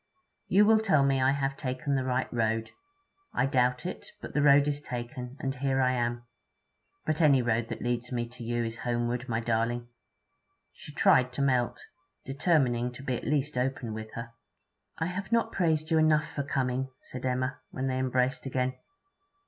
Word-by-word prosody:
You 205 +3 +5
will 220 +1 +6
tell 155 -11 +3
me 135 -1 +2
I 130 - +4
have 135 0 0
taken 130 0 -2
the 135 -1 +1
right 130 0 0
road. 115 -1 0 0.6
I - - +3
doubt 125 -1 +1
it. 180 - -5
But - - -8
the 150 - +2
road 145 0 +6
is 145 0 -1
taken, 125 0 -6
and 135 0 -2
here 135 0 0
I 130 -1 +3
am. 120 -1 -1 0.8
But 155 +1 0
any 140 -5 +5
road 115 -1 +1
that - - -5
leads 120 0 -2
me 120 -1 -1
to 125 0 -10
you 120 +1 -1
is 115 +1 -4
homeward, 120 0 -1
my 115 0 0
darling!' 120 +1 -1 0.8
She - - -11
tried 125 0 +4
to 140 - -1
melt, 125 -3 +1 0.4
determining 135 -4 +1
to 125 - -10
be 130 -2 -1
at - - -5
least 145 -2 0
open 125 -3 -2
with 110 0 -7
her. 115 0 -6 0.7
'I 160 - -1
have 190 +4 -4
not 230 0 +2
praised 160 -4 0
you 160 - +4
enough 155 -1 +4
for 145 - -2
coming,' 130 -2 -1
said 125 - -8
Emma, 130 +1 -1
when 130 - -4
they 130 -1 0
had 130 - 0
embraced 130 +1 0
again. 130 0 0
130 Hz, 190 wpm, -29 LUFS, 120-140 Hz, 0.8 s, will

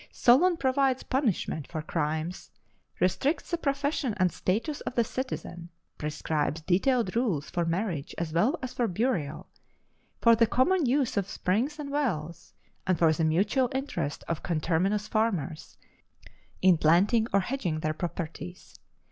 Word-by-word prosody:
Solon 335 +9 +4
provides 265 -2 +1
punishment 215 - -1
for 155 -2 -5
crimes, 160 +2 -3 0.5
restricts 270 - 0
the 340 - +1
profession 280 -4 -1
and 185 -2 +2
status 230 - -2
of - - -5
the 235 - +4
citizen, 195 -9 -5 0.3
prescribes 150 +1 -2
detailed 195 - +1
rules 200 - 0
for 175 -1 0
marriage 165 -3 -2
as 165 -2 -3
well 220 - +2
as 255 - -4
for 240 - 0
burial, 180 - -1 0.7
for 230 -1 +6
the 230 0 +4
common 290 +7 +2
use 260 -2 +1
of 200 -1 0
springs 240 +11 -1
and 290 -2 -6
wells, 170 - -3 0.3
and 185 -2 +2
for 160 -2 +4
the 160 - -1
mutual 205 - +2
interest 175 - -3
of 165 -2 -2
conterminous 180 +6 0
farmers 185 -9 -2 0.9
in 185 -3 +6
planting 200 +9 +4
or 200 - +3
hedging 185 - -2
their 155 0 0
properties. 175 +1 -6
195 Hz, 140 wpm, -28 LUFS, 165-255 Hz, 0.9 s, for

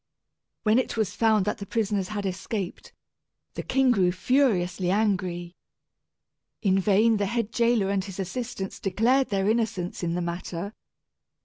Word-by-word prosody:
When 215 +3 +4
it 255 - -2
was 215 -3 0
found 220 -4 +3
that 210 - -2
the 200 - -5
prisoners 210 -4 0
had 205 -1 -4
escaped, 190 +1 -4 0.6
the - - -4
king 265 -1 +2
grew 185 -6 +3
furiously 185 -5 +1
angry. 185 -4 0 1.1
In 195 -2 +3
vain 215 +3 +4
the 200 -1 0
head 230 0 -1
jailor 235 -4 +2
and 195 -1 0
his 195 -1 -8
assistants 195 0 -4
declared 245 +7 +2
their 195 -1 0
innocence 215 -5 -1
in 170 -1 -1
the - - -1
matter. 175 +3 -4
200 Hz, 145 wpm, -26 LUFS, 185-225 Hz, 1.1 s, When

